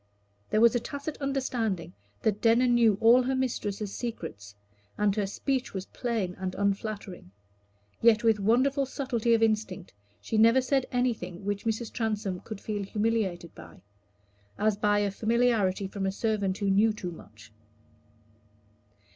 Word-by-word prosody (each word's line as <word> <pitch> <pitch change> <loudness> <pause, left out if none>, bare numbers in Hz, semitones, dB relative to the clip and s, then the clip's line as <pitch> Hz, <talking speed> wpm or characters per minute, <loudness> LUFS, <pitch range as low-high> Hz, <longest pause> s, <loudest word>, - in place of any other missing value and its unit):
There 215 - +2
was 235 -1 +6
a 240 - +1
tacit 285 +5 -6
understanding 245 - -2 0.3
that 210 -1 0
Denner 230 +2 +4
knew 235 -4 +4
all 235 +3 +6
her 260 +1 -1
mistress's 210 -6 -2
secrets, 105 - -6 0.4
and 205 -1 +2
her 205 -2 0
speech 260 +4 -2
was 190 0 -4
plain 225 -7 -3
and 185 -1 -4
unflattering; 200 - -3 0.7
yet 225 -2 +5
with 225 -2 +3
wonderful 260 +7 +2
subtlety 240 -4 0
of 225 - +1
instinct 215 -4 -1 0.3
she 220 - -2
never 230 +3 +6
said 265 0 0
anything 220 -8 -2
which 205 +1 -3
Mrs. 225 0 -2
Transome 210 -5 -2
could 215 0 -8
feel 210 -1 -4
humiliated 200 -4 -1
by, - - -14 0.7
as 215 0 +2
by 205 0 +2
familiarity 220 -3 +1
from 195 0 -3
a - - 0
servant 200 -2 -1
who 200 -1 0
knew 215 +3 +4
too 180 -4 -6
much. 110 -9 -14
215 Hz, 145 wpm, -28 LUFS, 195-235 Hz, 0.7 s, was